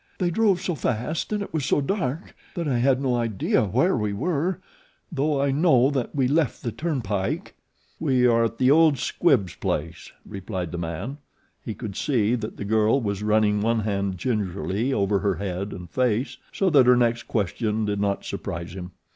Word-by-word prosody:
"They 175 -2 0
drove 200 -1 +3
so 180 - -2
fast 130 - -2
and 210 -1 0
it - - -10
was 155 -3 -1
so 145 - +2
dark 155 -1 -2 0.2
that 170 -3 -2
I 125 -4 +1
had 130 +1 +3
no 135 -2 0
idea 115 -3 +1
where 130 - +2
we 105 -3 -1
were, 165 - -1 0.5
though 150 -1 0
I 140 0 +2
know 135 -3 +4
that 135 -2 -2
we 135 -3 +2
left 150 -1 0
the 115 - -2
turnpike." 110 - -2 0.5
"We 130 -5 +2
are 115 -1 +4
at 115 0 -3
the 130 +1 +4
old 155 -2 +5
Squibbs 125 - +1
place," 80 +2 -4
replied 95 -3 -5
the 85 - -4
man. 85 - -5 0.4
He 110 - -5
could 105 -5 -6
see 120 -5 +1
that 115 -2 -3
the 100 - -5
girl 110 +4 +3
was 100 -4 -3
running 105 -1 +2
one 115 +1 +1
hand 100 -2 -2
gingerly 105 +2 -1
over 100 -4 +1
her 100 -1 0
head 95 +2 -4
and 90 -2 -8
face, 125 - -1
so 190 -2 +1
that 135 -5 +6
her 125 - +7
next 120 -1 +1
question 110 +1 -1
did 100 -1 -1
not 100 -1 -1
surprise 85 +1 -5
him. 90 -1 -8
115 Hz, 190 wpm, -24 LUFS, 100-140 Hz, 0.5 s, her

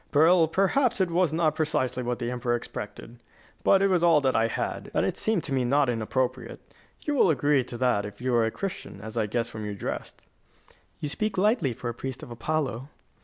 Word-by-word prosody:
"Well, 165 +2 +6
perhaps 215 - +2
it 185 -2 +1
was 175 -1 +2
not 160 -1 +2
precisely 140 -5 -1
what 120 0 -2
the 120 0 -3
emperor 120 -1 0
expected. 120 0 -7 0.4
But 195 0 +5
it - - +5
was 180 -3 +2
all 165 -3 +6
that 130 -2 +1
I 115 - +3
had, - - -3
and - - +2
it - - -1
seemed 215 -6 0
to 140 - -4
me 130 -1 +1
not 135 +2 +2
inappropriate. 125 +2 -2 0.4
You 295 - -2
will 255 -9 +4
agree 145 -2 +3
to 120 - -7
that 125 -5 +2
if 105 0 -8
you 125 0 -1
are 115 -1 +4
a - - +1
Christian, 185 - -6
as 110 +2 -8
I 110 -2 0
guess 115 +2 -1
from 110 - -7
your 105 -1 -4
dress." - - -4 0.9
"You 150 - -2
speak 215 +6 -2
lightly 205 - +2
for 120 - -6
a 120 - -2
priest 130 +2 -6
of - - -9
Apollo." 135 0 -2
130 Hz, 220 wpm, -27 LUFS, 120-170 Hz, 0.9 s, Well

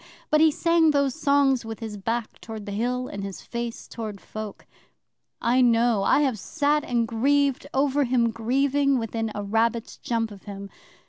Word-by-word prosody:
but 305 0 +5
he 320 - +7
sang 335 +1 +3
those 280 -3 +2
songs 280 -3 +2
with 225 -1 -7
his 220 -3 -6
back 225 +3 -3
toward 220 -2 -7
the 205 - -6
Hill, 250 +4 -1
and 200 -1 -6
his 195 -1 -7
face 235 -1 -5
toward 215 -3 -6
folk. 215 0 -8 0.7
I 245 +3 +2
know! 235 -3 +3
I 195 - +3
have 260 -7 0
sat 295 - 0
and 235 -2 0
grieved 275 +4 +1
over 285 +1 +2
him 240 -2 +2
grieving 275 +4 +1
within 225 -1 -2
a 205 - -3
rabbit's 225 +2 0
jump 225 -2 -2
of 200 -2 -13
him. 200 -1 -8
235 Hz, 175 wpm, -25 LUFS, 220-275 Hz, 0.7 s, he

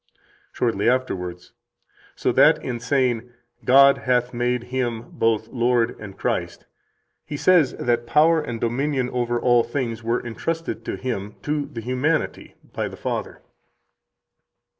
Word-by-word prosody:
Shortly 115 -2 +1
afterwards: 90 -9 -2 0.6
"So - - 0
that - - +5
in 120 -2 -3
saying, 125 -1 0 0.3
'God 140 +2 +6
hath 125 -1 0
made 120 0 0
Him 120 -2 -3
both 110 -1 0
Lord 120 -1 +1
and 100 -3 -9
Christ,' - - -2 0.6
he 145 - -6
says 170 -4 +4
that 120 -1 -1
power 160 +5 +4
and 120 -6 -5
dominion 130 +2 -1
over 120 -1 -1
all 120 -1 +4
things 120 -2 -3
were 115 +2 -1
entrusted 165 +8 -4
to - - -3
Him 105 -5 -4
[to 150 -1 -1
the 120 -6 -7
humanity] 130 +7 -1 0.2
by - - -2
the - - -9
Father." - - -4
125 Hz, 135 wpm, -23 LUFS, 115-135 Hz, 0.6 s, God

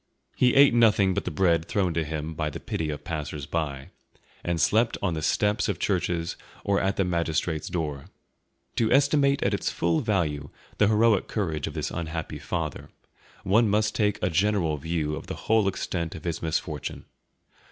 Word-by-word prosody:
He 125 -1 +3
ate 140 -2 +7
nothing 105 -5 +4
but - - -2
the - - -1
bread 85 -1 +2
thrown 95 -4 0
to 80 0 0
him 80 +1 -4
by 75 -1 -2
the - - -7
pity 80 -2 -3
of 75 -1 -5
passers 75 -3 -4
by, 70 -5 -3 0.5
and 85 -1 -1
slept 115 +9 +3
on 95 -4 0
the 80 - -3
steps 105 +7 +1
of 100 - -1
churches 85 -3 -1 0.3
or 100 -1 +1
at 95 +1 0
the 95 - +1
magistrates' 85 -2 -1
door. 75 -5 -3 0.7
To 110 -1 +2
estimate 140 +1 +3
at - - +1
its - - 0
full 85 -1 +1
value 80 -10 -1 0.3
the 105 - +5
heroic 110 -1 +3
courage 80 -9 -2
of - - -7
this - - -2
unhappy 80 -2 -4
father, 80 0 -4 0.5
one 110 +4 +3
must 105 +1 +2
take 105 -2 +1
a 90 - +1
general 90 -3 +1
view 75 0 -2
of 80 - -8
the 95 - -4
whole 110 -2 +3
extent 85 -3 -2
of - - -9
his 85 -2 -3
misfortune. 80 -2 -3
85 Hz, 180 wpm, -26 LUFS, 80-105 Hz, 0.7 s, ate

